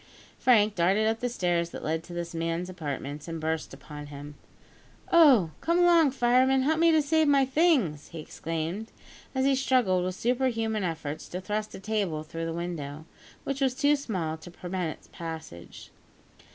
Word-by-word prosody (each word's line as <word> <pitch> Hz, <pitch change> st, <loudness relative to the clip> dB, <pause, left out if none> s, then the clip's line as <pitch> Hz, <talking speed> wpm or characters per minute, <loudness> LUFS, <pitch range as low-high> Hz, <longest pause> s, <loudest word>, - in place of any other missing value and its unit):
Frank 215 Hz, -4 st, +4 dB
darted 190 Hz, +4 st, +2 dB
up 225 Hz, +1 st, +1 dB
the 245 Hz, -, -1 dB
stairs 175 Hz, -6 st, 0 dB
that -, -, -8 dB
led 160 Hz, +1 st, -1 dB
to -, -, -12 dB
this 170 Hz, 0 st, -5 dB
man's 165 Hz, +2 st, -2 dB
apartments, 145 Hz, -3 st, -5 dB
and 165 Hz, -1 st, -4 dB
burst 160 Hz, 0 st, -2 dB
in -, -, -11 dB
upon 150 Hz, -1 st, -9 dB
him. 145 Hz, 0 st, -9 dB, 0.8 s
"Oh! 275 Hz, -, +6 dB
come 335 Hz, +1 st, +1 dB
along, 345 Hz, -4 st, +5 dB
fireman; 260 Hz, +1 st, +3 dB
help 315 Hz, +3 st, +1 dB
me 335 Hz, 0 st, +5 dB
to 315 Hz, -2 st, +4 dB
save 315 Hz, +1 st, +2 dB
my 280 Hz, -2 st, +4 dB
things," 265 Hz, -, +2 dB
he 165 Hz, -, -10 dB
exclaimed, 165 Hz, +7 st, -4 dB, 0.4 s
as 265 Hz, 0 st, +1 dB
he 275 Hz, -, +4 dB
struggled 250 Hz, -9 st, +2 dB
with 185 Hz, 0 st, -2 dB
superhuman 230 Hz, -3 st, 0 dB
efforts 160 Hz, -3 st, -4 dB
to 180 Hz, -, -5 dB
thrust 210 Hz, +3 st, -3 dB
a -, -, -8 dB
table 195 Hz, -7 st, -2 dB
through 165 Hz, +1 st, -5 dB
the -, -, -3 dB
window, 160 Hz, -3 st, -5 dB, 0.4 s
which 275 Hz, 0 st, -3 dB
was 260 Hz, -2 st, +2 dB
too 285 Hz, +2 st, +3 dB
small 185 Hz, -, -3 dB
to 160 Hz, -, -12 dB
permit 175 Hz, -1 st, -4 dB
its -, -, -23 dB
passage. 160 Hz, -, -8 dB
185 Hz, 180 wpm, -28 LUFS, 165-260 Hz, 0.8 s, Oh